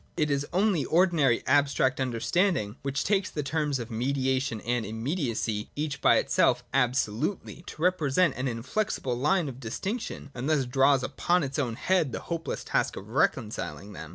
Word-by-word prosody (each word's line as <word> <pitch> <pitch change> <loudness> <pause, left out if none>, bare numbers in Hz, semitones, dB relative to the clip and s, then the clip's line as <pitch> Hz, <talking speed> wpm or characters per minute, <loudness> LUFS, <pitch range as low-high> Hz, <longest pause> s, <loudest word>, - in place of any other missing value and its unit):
It 150 -1 +1
is 140 +1 0
only 190 -4 +2
ordinary 160 -7 +2
abstract 140 -1 +2
understanding 130 - 0
which 135 0 -2
takes 195 -2 +1
the 150 - -3
terms 150 -1 -1
of 120 -1 -6
mediation 130 0 0
and 120 -1 -1
immediacy, 110 - -2
each 145 -2 -3
by - - +5
itself - - +2
absolutely, 130 - -1
to 155 - -7
represent 175 -3 +2
an 130 +2 -2
inflexible 125 - -2
line 150 +7 +1
of 130 -2 -7
distinction, 190 - -5
and 125 +4 -3
thus 150 -4 +2
draws 135 +1 +3
upon 175 +6 +1
its 140 +2 -3
own 120 -5 -1
head 170 -2 +1
the - - -4
hopeless 165 -1 -4
task - - 0
of 100 +2 -9
reconciling 105 - -1
them. 80 -4 -8
135 Hz, 160 wpm, -28 LUFS, 120-160 Hz, -, by